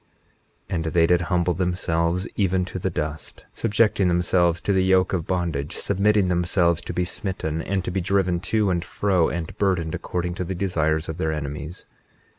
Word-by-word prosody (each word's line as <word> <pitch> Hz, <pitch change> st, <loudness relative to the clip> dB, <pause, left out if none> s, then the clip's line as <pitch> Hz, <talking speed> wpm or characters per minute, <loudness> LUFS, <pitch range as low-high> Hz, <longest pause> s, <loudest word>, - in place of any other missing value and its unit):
21:13 -, -, -2 dB
And 80 Hz, -, -1 dB
they 80 Hz, +1 st, +3 dB
did 85 Hz, +1 st, +3 dB
humble 85 Hz, +1 st, +1 dB
themselves 90 Hz, 0 st, 0 dB
even 95 Hz, -2 st, +1 dB
to 95 Hz, -, -6 dB
the 95 Hz, -, -1 dB
dust, 80 Hz, -2 st, -5 dB
subjecting 105 Hz, -3 st, +2 dB
themselves 85 Hz, -1 st, +2 dB
to 100 Hz, -, 0 dB
the 95 Hz, -1 st, +3 dB
yoke 95 Hz, 0 st, +3 dB
of 85 Hz, -4 st, -1 dB
bondage, 85 Hz, -4 st, -2 dB
submitting 100 Hz, 0 st, +2 dB
themselves 85 Hz, -1 st, +2 dB
to -, -, -6 dB
be 90 Hz, -, -1 dB
smitten, 80 Hz, -4 st, -3 dB
and 95 Hz, +1 st, -2 dB
to -, -, -2 dB
be 95 Hz, +1 st, -1 dB
driven 95 Hz, -1 st, +1 dB
to 100 Hz, +2 st, +1 dB
and 85 Hz, -1 st, 0 dB
fro, 95 Hz, -5 st, +1 dB
and 85 Hz, -2 st, -4 dB
burdened, 90 Hz, -5 st, +1 dB
according 90 Hz, -1 st, -3 dB
to 90 Hz, -, -3 dB
the 95 Hz, +2 st, -4 dB
desires 80 Hz, -4 st, 0 dB
of 80 Hz, -, -5 dB
their 80 Hz, -, 0 dB
enemies. 75 Hz, +2 st, -5 dB
90 Hz, 185 wpm, -24 LUFS, 85-95 Hz, -, they